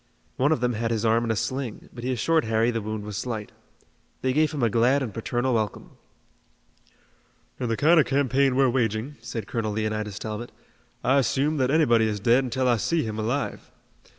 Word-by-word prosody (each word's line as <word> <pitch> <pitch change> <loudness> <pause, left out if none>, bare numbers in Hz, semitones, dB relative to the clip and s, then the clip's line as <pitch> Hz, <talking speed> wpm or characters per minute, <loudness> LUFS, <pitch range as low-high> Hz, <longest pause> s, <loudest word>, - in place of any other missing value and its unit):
One 140 +4 +2
of 155 - +1
them 125 0 +1
had 115 +1 -2
his 115 -1 -1
arm 115 +1 +3
in - - -3
a 110 - +1
sling, 130 +1 -4
but 120 - -9
he 130 - -1
assured 155 +7 +1
Harry 110 +2 +2
the 115 -1 -2
wound 110 0 -4
was 105 -1 -6
slight. 110 -2 -4 0.7
They 130 0 +1
gave 155 +1 +2
him 145 -5 -3
a - - +5
glad 125 +5 +3
and 115 -6 -5
paternal 120 +3 -1
welcome. 110 -3 -2 1.7
"In 125 - -2
the 115 - 0
kind 165 +3 +5
of 150 - +3
campaign 135 -1 +2
we're 135 0 +4
waging," 120 +2 -1
said 120 -2 -5
Colonel 110 -3 -2
Leonidas 110 -1 -2
Talbot, 110 +2 -5 0.5
"I 135 +2 +4
assume 140 +5 +1
that 130 -2 +1
anybody 120 -7 +4
is 105 -1 -2
dead 120 +5 +3
until 130 +1 -1
I 120 -1 +3
see 165 +9 0
him 110 -1 -4
alive. 120 +6 -3
120 Hz, 200 wpm, -25 LUFS, 110-135 Hz, 1.7 s, a